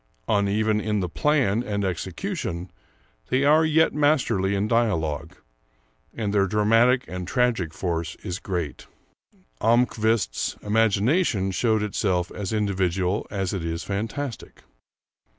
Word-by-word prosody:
Uneven 105 +1 +1
in 105 -1 -1
the 90 - -1
plan 120 - +1
and 100 -4 -2
execution, 95 - -4 0.6
they 130 +2 +2
are 155 +3 +5
yet 160 +1 +3
masterly 125 -10 +2
in 100 +2 0
dialogue, 100 -11 0 0.8
and 105 -3 -2
their 100 -1 +3
dramatic 115 +5 +3
and 90 -1 -6
tragic 115 - +1
force 85 -3 -3
is 90 -2 -4
great. 85 - -4 0.7
Almquist's 115 - +1
imagination 110 - +2
showed 110 +2 +1
itself 95 -4 -1
as 100 -3 -5
individual 95 -2 0
as 95 -2 -2
it 95 -4 -3
is 85 0 -3
fantastic. 115 +6 -5
105 Hz, 115 wpm, -24 LUFS, 95-115 Hz, 0.8 s, are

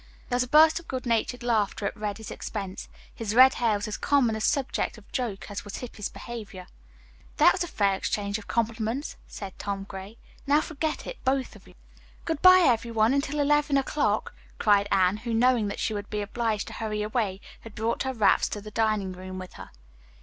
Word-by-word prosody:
There 245 - 0
was 250 - +2
a 250 - -1
burst 315 +4 +6
of 340 - -16
good 260 -1 -4
natured 235 +1 0
laughter 215 -4 0
at - - -2
Reddy's 210 0 -5
expense. 195 -3 -6 0.2
His 220 -1 -4
red 260 +2 +8
hair 225 -3 +3
was 205 +1 -3
as 215 - -4
common 265 -6 +2
a 220 - -4
subject 265 0 0
of 210 - -17
joke 230 -6 -3
as 205 - -5
was 205 - -7
Hippy's 225 -4 -6
behavior. 210 -6 -8 0.7
"That - - +7
was - - -1
a - - -4
fair 200 -9 +1
exchange 200 +2 -2
of 205 - -13
compliments," 230 +4 -2
said 195 -2 -8
Tom 200 -1 -3
Gray. 195 +2 -9 0.3
"Now 290 +2 +5
forget 310 0 -3
it, - - -8
both 265 0 0
of - - -16
you." - - -17 0.5
"Good 320 -3 -2
bye, 370 0 +8
every 235 -1 +2
one, 225 +1 +3
until 280 +1 -1
eleven 295 0 +3
o'clock," 260 -6 0 0.2
cried 205 -1 +3
Anne, 185 +1 +3
who, 230 +1 -3
knowing 240 -2 +3
that 200 - -5
she 220 - -1
would 205 -1 -5
be 210 - -2
obliged 220 0 -2
to - - -9
hurry 210 -2 -3
away, 210 -3 -1 0.2
had 225 -2 -12
brought 225 +2 -1
her 265 - -1
wraps 215 -3 +3
to 210 - -4
the 210 +1 -10
dining 215 -3 0
room 185 0 -8
with 185 0 -8
her. - - -10
220 Hz, 210 wpm, -27 LUFS, 205-255 Hz, 0.7 s, red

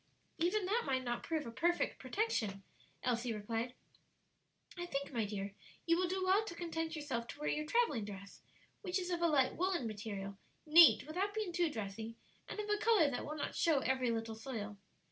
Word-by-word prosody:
"Even 365 +4 +2
that 435 +6 +2
might 260 -1 +1
not 240 -1 -2
prove 315 -3 -2
a 230 - -5
perfect 345 +9 +1
protection," 215 - -1 0.4
Elsie 240 -2 0
replied. 225 +4 -3 1.0
"I 350 -1 -4
think, 280 -3 -3
my 230 -3 +1
dear, 200 -1 -4 0.3
you 335 - +4
will 360 +1 +1
do 375 +1 -1
well 385 +3 +4
to 340 - -6
content 325 -1 -3
yourself 265 -6 -3
to - - -9
wear 300 - -1
your 305 0 -1
travelling 315 - +2
dress, 200 -1 -9 0.4
which 360 +1 -1
is 365 -1 -3
of 345 -1 -1
a 340 - +5
light 280 -5 +3
woollen 360 -6 +1
material, 200 -2 -5 0.3
neat 325 +2 +8
without 380 +7 -2
being 425 -5 -2
too 345 -1 +2
dressy, 220 -2 -5 0.3
and - - -5
of 420 - -2
a 420 0 +2
color 420 -10 +4
that 245 - -3
will 300 - -4
not 285 - -3
show 310 -5 +3
every 260 -1 +1
little 225 -1 -2
soil. 220 -3 -5
290 Hz, 195 wpm, -36 LUFS, 225-350 Hz, 1.0 s, neat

